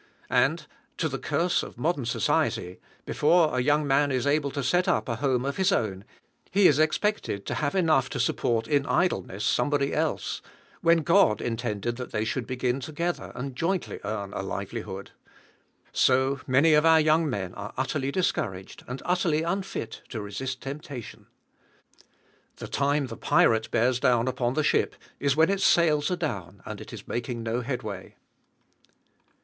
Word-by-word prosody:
And, - - +2 0.3
to - - 0
the - - -4
curse - - +1
of - - -9
modern - - -1
society, 90 +1 0 0.3
before 160 -1 +3
a 125 - +2
young 150 +3 +2
man 140 +1 +2
is 130 -1 0
able 145 0 +2
to 140 0 -4
set 175 +8 +2
up - - +1
a 115 -2 -2
home 130 -1 0
of 140 - -2
his 190 +1 +3
own, 100 - -1 0.4
he 195 0 +5
is 145 -1 +3
expected 155 - 0
to - - -3
have 145 +3 -1
enough 155 -8 +3
to - - -4
support 115 -1 0
in 140 +2 +1
idleness 175 - 0
somebody 140 +2 +1
else; 155 0 -1 0.4
when 165 -1 +4
God 170 - +4
intended 115 -1 -3
that 125 - -6
they 110 0 -1
should 120 +2 -2
begin 125 0 -1
together, 160 +6 -3
and 130 +1 -5
jointly 175 +6 -2
earn 100 -1 -4
a - - -3
livelihood. 100 0 -5 0.8
So, 130 +1 +2
many 140 +5 +4
of 150 0 +5
our 160 0 +6
young 155 0 +3
men 95 -7 -3
are 105 +1 -7
utterly 135 +1 -1
discouraged, 95 - -2
and 125 +2 -6
utterly 170 -3 +1
unfit 180 - -3
to 115 - -5
resist 115 +6 -5
temptation. 135 -3 -8 1.3
The - - -8
time 140 0 +1
the 115 -3 -8
pirate 110 0 +3
bears 125 +2 +2
down 125 -2 +3
upon 125 -1 -1
the 155 - +1
ship - - +1 0.2
is 140 -1 +1
when 160 +4 +4
its 195 -1 0
sails 155 -5 +4
are 180 - 0
down 100 - -5
and 105 0 -7
it - - -10
is 110 -3 -9
making 120 0 -3
no 115 +2 -1
headway. 115 -7 -5
130 Hz, 165 wpm, -27 LUFS, 115-155 Hz, 1.3 s, our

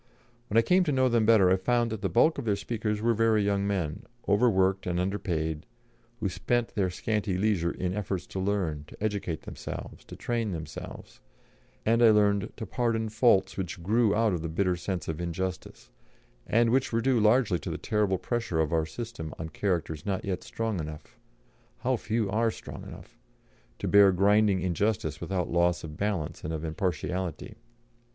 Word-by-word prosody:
When 105 - 0
I 115 - +6
came 185 +5 +4
to 150 - +1
know 130 -1 +3
them 115 -2 +2
better, 100 -5 +6
I 95 - +4
found 120 +4 +1
that 110 -2 -4
the 95 - 0
bulk 155 - +3
of 135 - -5
their 105 -3 +2
speakers 105 -1 -3
were 115 0 +3
very 110 -1 +3
young 100 0 +1
men, 90 -7 -2 0.3
overworked 95 -3 +3
and 90 0 0
underpaid, 85 -4 -2 0.5
who - - 0
spent 120 +5 0
their 100 -5 0
scanty 105 +1 -1
leisure 95 -4 +1
in 90 +1 -3
efforts 95 -2 -3
to 95 - -6
learn, 95 -7 -1
to - - -13
educate 100 -6 -2
themselves, - - -7
to - - -10
train 115 -4 -2
themselves, 80 -3 -8 0.7
and 115 +2 +3
I 115 - +8
learned 105 -1 +3
to 110 - -5
pardon 115 0 -1
faults 105 -4 +3
which 95 -1 -4
grew 110 +2 +3
out 110 -2 +2
of 85 - -2
the 80 - -3
bitter 90 +2 +1
sense 90 +1 -4
of 80 +1 -3
injustice, 90 +2 -5 0.6
and 115 +1 +3
which 130 +1 +2
were 115 0 +1
due 130 0 +2
largely 110 -4 +3
to - - -6
the - - -3
terrible 105 -3 0
pressure 115 -6 -2
of 80 0 +1
our 80 -1 +1
system 110 -3 -6
on 80 0 -5
characters 80 -4 -2
not 95 -2 -2
yet 95 -2 -2
strong 115 -4 -3
enough 75 -1 -7 0.7
how 130 +1 +1
few 110 -1 -1
are 115 +3 +2
strong - - -8
enough! - - -12 0.6
to - - -4
bear 100 -1 +7
grinding 100 +1 +3
injustice 90 -4 -1
without 90 -3 -2
loss 85 0 +2
of 75 -2 -7
balance 85 -5 -2
and 80 - -3
of 80 0 -4
impartiality. 90 0 -3
100 Hz, 185 wpm, -28 LUFS, 90-110 Hz, 0.7 s, I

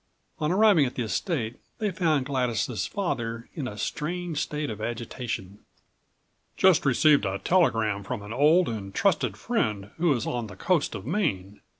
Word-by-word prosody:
On 150 +1 0
arriving 195 -7 +5
at 125 - -7
the 125 - -1
estate 115 - -2 0.2
they 210 -2 -1
found 160 -6 +1
Gladys' 125 -4 -1
father 120 - -3
in 145 -6 -4
a 105 - -7
strange 165 - -3
state 150 -4 -2
of 110 - -7
agitation. 115 -4 -5 1.0
"Just 185 -6 +4
received 145 +3 +5
a 95 -1 -1
telegram 110 - +2
from 105 0 -5
an 105 +2 -7
old 155 +7 +4
and 100 -4 -5
trusted - - +1
friend 100 -1 -1
who 170 -1 +2
is 120 -4 -2
on 120 -2 -2
the 95 - -10
coast 165 - 0
of 95 - -7
Maine. 125 - -2
125 Hz, 165 wpm, -26 LUFS, 110-165 Hz, 1.0 s, arriving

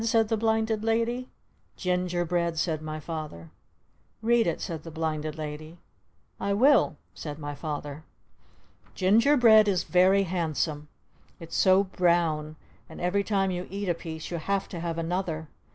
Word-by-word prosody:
_" - - -3
said 225 -1 +2
the 225 - +2
Blinded 220 0 0
Lady. 230 +3 0 0.5
"Ginger 180 -1 0
bread!" 170 -1 -1
said 160 -2 -1
my 155 0 -5
Father. 155 - -7 0.7
"Read 235 -1 +3
it!" 170 - -1
said 165 -2 -5
the 165 - -9
Blinded 155 -1 -3
Lady. 155 +2 -7 0.6
"I 200 - 0
will!" 245 - +4 0.2
said 150 -2 -7
my 145 -1 -5
Father. 145 0 -5 0.9
Ginger 225 +10 +4
bread 220 -4 +7
is 185 -3 +1
very 185 +2 +4
handsome! 160 -4 -2 0.5
It's 165 -1 -8
so 190 +1 +5
brown! 170 -5 +1 0.3
And - - -10
every 185 +3 +1
time 195 -2 +1
you 180 0 -4
eat 200 0 -3
a - - +3
piece 160 -1 -7
you 170 - -2
have 195 +4 -1
to 175 - -6
have 165 0 -3
another! 165 -2 -2
175 Hz, 155 wpm, -27 LUFS, 155-200 Hz, 0.9 s, bread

